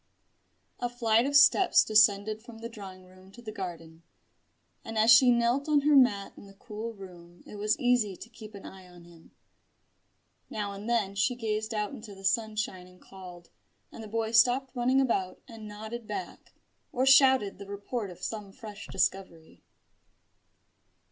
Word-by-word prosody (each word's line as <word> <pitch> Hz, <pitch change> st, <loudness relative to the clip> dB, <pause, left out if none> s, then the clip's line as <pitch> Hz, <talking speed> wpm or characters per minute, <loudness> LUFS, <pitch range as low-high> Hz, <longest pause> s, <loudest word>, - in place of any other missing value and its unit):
A 245 Hz, -, -2 dB
flight 235 Hz, 0 st, +1 dB
of 285 Hz, -, -2 dB
steps 320 Hz, +6 st, +5 dB
descended 215 Hz, 0 st, +3 dB
from 235 Hz, 0 st, -13 dB
the 230 Hz, +1 st, -8 dB
drawing 190 Hz, -4 st, -11 dB
room 185 Hz, +1 st, -18 dB
to 240 Hz, -, -13 dB
the 215 Hz, -, -7 dB
garden, 165 Hz, -5 st, -8 dB, 0.8 s
and 225 Hz, 0 st, -7 dB
as 220 Hz, +2 st, +5 dB
she 245 Hz, +2 st, +7 dB
knelt 240 Hz, +4 st, +1 dB
on 295 Hz, -1 st, +3 dB
her 295 Hz, +1 st, +3 dB
mat 210 Hz, -7 st, +3 dB
in -, -, -14 dB
the 195 Hz, -, -16 dB
cool 215 Hz, +3 st, -7 dB
room 175 Hz, -3 st, -14 dB
it 210 Hz, -, -11 dB
was 210 Hz, +2 st, 0 dB
easy 245 Hz, -7 st, +1 dB
to 220 Hz, -, -12 dB
keep 220 Hz, -2 st, -13 dB
an 195 Hz, -, -11 dB
eye 190 Hz, -1 st, -12 dB
on 175 Hz, -1 st, -16 dB
him. 170 Hz, -1 st, -18 dB, 1.2 s
Now 205 Hz, -2 st, -4 dB
and 200 Hz, +3 st, -8 dB
then 215 Hz, -5 st, 0 dB
she 205 Hz, +6 st, 0 dB
gazed 220 Hz, -1 st, -3 dB
out 210 Hz, -2 st, -2 dB
into 215 Hz, -2 st, -10 dB
the 195 Hz, 0 st, -11 dB
sunshine 215 Hz, -3 st, -2 dB
and 180 Hz, 0 st, -19 dB
called; 180 Hz, -3 st, -13 dB, 0.4 s
and 225 Hz, -, -10 dB
the -, -, -9 dB
boy 225 Hz, +1 st, -3 dB
stopped 250 Hz, +3 st, +3 dB
running 250 Hz, +2 st, +1 dB
about 215 Hz, -8 st, -1 dB
and 225 Hz, -3 st, -11 dB
nodded 220 Hz, +2 st, -8 dB
back, 380 Hz, -, -8 dB, 0.4 s
or 260 Hz, -1 st, 0 dB
shouted 265 Hz, -7 st, +4 dB
the 200 Hz, -, -10 dB
report 200 Hz, +2 st, -5 dB
of 180 Hz, +1 st, -13 dB
some 210 Hz, -2 st, -6 dB
fresh 210 Hz, 0 st, -11 dB
discovery. 185 Hz, -4 st, -3 dB
215 Hz, 170 wpm, -28 LUFS, 195-235 Hz, 1.2 s, she